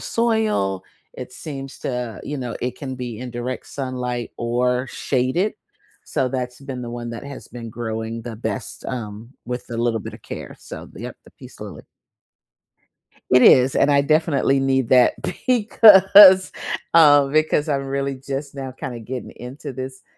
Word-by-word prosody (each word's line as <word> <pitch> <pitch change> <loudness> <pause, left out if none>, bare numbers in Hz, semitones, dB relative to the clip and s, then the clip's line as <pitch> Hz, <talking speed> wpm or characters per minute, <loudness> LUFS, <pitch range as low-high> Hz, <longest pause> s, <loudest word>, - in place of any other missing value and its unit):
soil, 220 - 0 0.3
it 125 0 -9
seems 135 -2 -8
to 125 -3 -4
you 145 - -4
know, 125 -2 -5
it 125 0 -3
can 130 -3 -5
be 120 -3 -6
in 125 0 -6
direct 120 +2 -5
sunlight 125 -3 -4
or 125 +2 0
shaded, 135 +10 -1 0.5
so 130 - -1
that's 125 0 -4
been 130 -2 -6
the 120 - -6
one 120 -1 -6
that 115 +3 -7
has 140 -1 -9
been 115 -2 -8
growing 115 0 -5
the 115 -1 -7
best, 115 0 -5
um, 115 -1 -6
with 125 0 -5
a 115 - -4
little 115 -1 0
bit - - -8
of - - -14
care. - - -8
So - - -9
the - - -12
yep, - - -7
the - - -17
peace - - -14
lily. - - -9 1.5
It 125 0 +6
is, 130 +1 +6
and 145 - +3
I 140 0 +4
definitely 145 -3 +2
need 130 -2 +1
that 125 -1 +5 0.3
because 200 -5 +7 0.4
uh, 145 -4 +7
because 155 +1 +1
I'm 140 -1 -1
really 140 0 -2
just 135 +2 -6
now 135 -1 -6
kinda 130 -2 -7
getting 125 +3 -6
into 135 +3 -8
this 130 +1 -7
130 Hz, 165 wpm, -21 LUFS, 120-140 Hz, 1.5 s, because